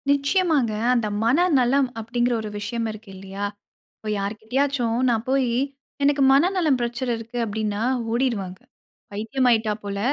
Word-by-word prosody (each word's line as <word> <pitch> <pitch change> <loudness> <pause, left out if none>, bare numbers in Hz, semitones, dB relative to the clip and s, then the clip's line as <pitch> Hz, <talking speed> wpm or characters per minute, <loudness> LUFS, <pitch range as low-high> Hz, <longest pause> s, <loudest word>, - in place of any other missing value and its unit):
நிச்சயமாங்க. 285 - +2 0.2
அந்த 235 -3 +1 0.2
மனநலம் 270 -1 +3
அப்படிங்கிற 240 +2 0
ஒரு 215 - -5
விஷயம் 230 +2 -3
இருக்கு 215 -1 -12
இல்லையா? 195 +1 -5 0.5
இப்போ 215 - -7
யார்கிட்டயாச்சும் 230 +4 -1
நான் 230 0 0
போய் 265 -2 +2 0.5
"எனக்கு 280 0 +3
மனநலம் 320 -2 +3
பிரச்சனை 240 +1 -2
இருக்கு." 230 +2 -8
அப்படின்னா 210 -1 -2 0.3
ஓடிடுவாங்க. 225 -7 -1 0.5
"பைத்தியம் 225 +6 -1
ஆயிட்டா 220 -2 +2
போல 200 -1 -4
240 Hz, 125 wpm, -23 LUFS, 215-270 Hz, 0.5 s, மனநலம்